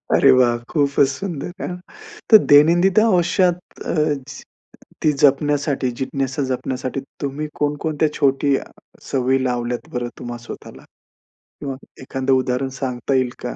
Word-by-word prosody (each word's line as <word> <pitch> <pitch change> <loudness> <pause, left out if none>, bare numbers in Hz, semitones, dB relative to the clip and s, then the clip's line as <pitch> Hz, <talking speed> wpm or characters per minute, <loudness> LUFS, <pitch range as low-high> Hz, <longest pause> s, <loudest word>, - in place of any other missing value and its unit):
अरे - - +6
वाह! 125 -2 +4
खूपच 140 -2 +2
सुंदर. 175 -4 -5
हां. 180 - -4 0.5
तर 220 - +10
दैनंदिन 175 +7 +6
आयुष्यात 180 -4 +2 0.3
अ, - - -2 1.1
ती 155 - +4
जपण्यासाठी 145 -2 +2
जिज्ञासा 135 +1 -2
जपण्यासाठी 130 +1 -3 0.2
तुम्ही 145 +2 -3
कोण-कोणत्या 150 +1 0
छोटी 140 -1 +2 0.6
सवयी 130 0 +1
लावल्यात 125 +3 -2
बरं 120 0 -2
तुम्हा 120 0 -6
स्वतःला? - - -10 0.8
किंवा 135 -2 -4 0.3
एखादं 130 0 -1
उदाहरण 130 0 0
सांगता 130 0 -2
येईल 130 -1 +2
का? - - -4
140 Hz, 120 wpm, -20 LUFS, 130-150 Hz, 1.1 s, तर